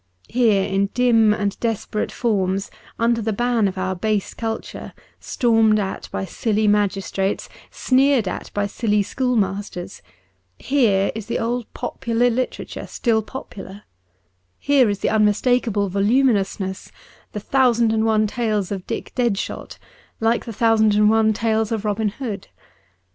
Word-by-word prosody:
Here 225 Hz, -5 st, +3 dB
in 195 Hz, +1 st, 0 dB
dim 230 Hz, -3 st, +4 dB
and 205 Hz, -1 st, -1 dB
desperate 225 Hz, -2 st, -2 dB
forms, 195 Hz, -4 st, -1 dB, 0.3 s
under 230 Hz, 0 st, +1 dB
the 220 Hz, +1 st, -1 dB
ban 235 Hz, 0 st, +1 dB
of 190 Hz, 0 st, -5 dB
our 185 Hz, 0 st, -2 dB
base 210 Hz, +2 st, -1 dB
culture, 225 Hz, -1 st, -5 dB, 0.3 s
stormed 225 Hz, -3 st, +2 dB
at 195 Hz, -2 st, -4 dB
by -, -, -3 dB
silly 215 Hz, +3 st, 0 dB
magistrates, 195 Hz, -1 st, 0 dB, 0.2 s
sneered 265 Hz, -4 st, +2 dB
at -, -, -5 dB
by 205 Hz, 0 st, +1 dB
silly 210 Hz, 0 st, 0 dB
schoolmasters 205 Hz, -5 st, -2 dB, 0.3 s
— 90 Hz, 0 st, -45 dB
here 220 Hz, -8 st, +2 dB
is 220 Hz, -2 st, -7 dB
the 235 Hz, -, -1 dB
old 235 Hz, 0 st, -2 dB
popular 235 Hz, +1 st, 0 dB
literature 255 Hz, +2 st, -4 dB
still 225 Hz, -3 st, 0 dB
popular; 205 Hz, -4 st, -9 dB, 0.7 s
here 275 Hz, -5 st, +3 dB
is 205 Hz, -, -1 dB
the -, -, +1 dB
unmistakable 215 Hz, 0 st, +2 dB
voluminousness, 200 Hz, -2 st, 0 dB, 0.4 s
the 210 Hz, -, -3 dB
thousand 235 Hz, -1 st, +2 dB
and 220 Hz, 0 st, +1 dB
one 220 Hz, -1 st, +2 dB
tales 210 Hz, -3 st, -1 dB
of 195 Hz, -2 st, -5 dB
Dick 230 Hz, -, -5 dB
Deadshot, 235 Hz, -6 st, -2 dB, 0.4 s
like 225 Hz, +1 st, +1 dB
the 230 Hz, -, -6 dB
thousand 220 Hz, -1 st, +3 dB
and 210 Hz, 0 st, +5 dB
one 220 Hz, 0 st, +3 dB
tales 220 Hz, 0 st, 0 dB
of 220 Hz, -2 st, -2 dB
Robin 210 Hz, +1 st, 0 dB
Hood. 210 Hz, -3 st, -6 dB
215 Hz, 140 wpm, -21 LUFS, 200-235 Hz, 0.7 s, and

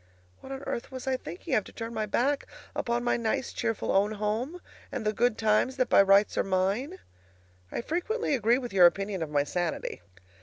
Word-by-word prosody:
What 265 Hz, -, -11 dB
on 270 Hz, 0 st, -6 dB
earth 235 Hz, -, -4 dB
was 260 Hz, -1 st, -7 dB
I 265 Hz, -1 st, +1 dB
thinking 175 Hz, -7 st, -6 dB
of 215 Hz, -, +3 dB
to -, -, -11 dB
turn 230 Hz, 0 st, -6 dB
my 215 Hz, -1 st, -2 dB
back 275 Hz, +7 st, +1 dB, 0.3 s
upon 235 Hz, 0 st, -1 dB
my 240 Hz, -, +2 dB
nice 235 Hz, +3 st, -1 dB
cheerful 225 Hz, -3 st, -1 dB
own 205 Hz, +2 st, +3 dB
home 220 Hz, -, -2 dB, 0.3 s
and 260 Hz, -5 st, -4 dB
the 215 Hz, -, +1 dB
good 240 Hz, 0 st, +2 dB
times 220 Hz, +4 st, +2 dB
that 255 Hz, -, +1 dB
by -, -, +7 dB
rights 195 Hz, +1 st, +4 dB
are -, -, +3 dB
mine? 195 Hz, -, 0 dB, 0.7 s
I -, -, -2 dB
frequently 355 Hz, -, -1 dB
agree 235 Hz, -1 st, +3 dB
with 245 Hz, -5 st, -5 dB
your 180 Hz, -2 st, +8 dB
opinion 195 Hz, +1 st, -2 dB
of 160 Hz, -, -2 dB
my 145 Hz, -1 st, +2 dB
sanity. 175 Hz, +3 st, -3 dB
225 Hz, 200 wpm, -28 LUFS, 200-260 Hz, 0.7 s, your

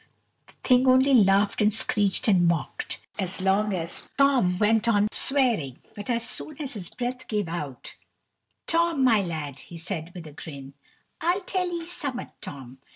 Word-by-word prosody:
The -, -, -20 dB
thing 255 Hz, 0 st, +4 dB
only 260 Hz, +2 st, +5 dB
laughed 200 Hz, -3 st, +4 dB
and 210 Hz, 0 st, +4 dB
screeched 205 Hz, -1 st, +3 dB
and 180 Hz, -5 st, +4 dB
mocked, 170 Hz, -3 st, -2 dB, 0.2 s
as 190 Hz, -1 st, -3 dB
long 195 Hz, +3 st, +1 dB
as 170 Hz, -3 st, -3 dB
Tom 265 Hz, -11 st, +3 dB
went 220 Hz, +2 st, +2 dB
on 210 Hz, -2 st, +3 dB
swearing, 235 Hz, -, +2 dB, 0.2 s
but 205 Hz, -1 st, -8 dB
so 240 Hz, -, +1 dB
soon 235 Hz, +6 st, -3 dB
as 285 Hz, -3 st, -4 dB
his 190 Hz, -6 st, -6 dB
breath 250 Hz, +1 st, -5 dB
gave 210 Hz, -4 st, -2 dB
out 150 Hz, -6 st, -6 dB, 0.7 s
"Tom, 335 Hz, -4 st, +2 dB
my 225 Hz, -5 st, +4 dB
lad," 155 Hz, -6 st, -5 dB
he 170 Hz, -, -11 dB
said 165 Hz, -1 st, -5 dB
with 175 Hz, -2 st, -8 dB
a 155 Hz, -, -10 dB
grin, 140 Hz, -3 st, -10 dB, 0.5 s
"I'll 350 Hz, +5 st, +1 dB
tell 365 Hz, -1 st, -2 dB
'ee 340 Hz, -1 st, -4 dB
summat, 285 Hz, -7 st, -2 dB
Tom. 135 Hz, -2 st, -9 dB
210 Hz, 165 wpm, -25 LUFS, 170-260 Hz, 0.7 s, only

